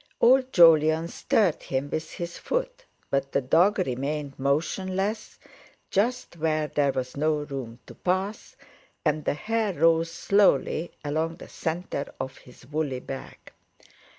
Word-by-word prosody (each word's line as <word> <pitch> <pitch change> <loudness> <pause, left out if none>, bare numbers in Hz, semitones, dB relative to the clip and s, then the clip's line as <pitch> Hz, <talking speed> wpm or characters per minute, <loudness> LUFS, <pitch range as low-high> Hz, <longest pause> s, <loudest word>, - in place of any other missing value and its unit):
Old 260 +2 +5
Jolyon 160 - +6
stirred 185 -3 +1
him 135 +1 -2
with 155 0 -3
his 175 0 -5
foot, - - -3 0.3
but 135 0 0
the - - +3
dog 165 +10 +3
remained 140 -2 -2
motionless, 190 +9 -1 0.5
just 235 -1 0
where 155 -1 +1
there 145 -2 +1
was 130 -1 -4
no 155 +2 +2
room 130 -5 -6
to - - -11
pass, 190 +7 -2 0.5
and 150 0 +1
the - - +1
hair 220 +4 -1
rose 165 +2 +3
slowly 180 -5 +2
along 160 +3 -1
the - - -11
centre 165 -3 -4
of 130 0 -5
his 125 -1 -17
woolly 145 -2 -2
back. 135 +1 -9
160 Hz, 135 wpm, -26 LUFS, 140-190 Hz, 0.5 s, Jolyon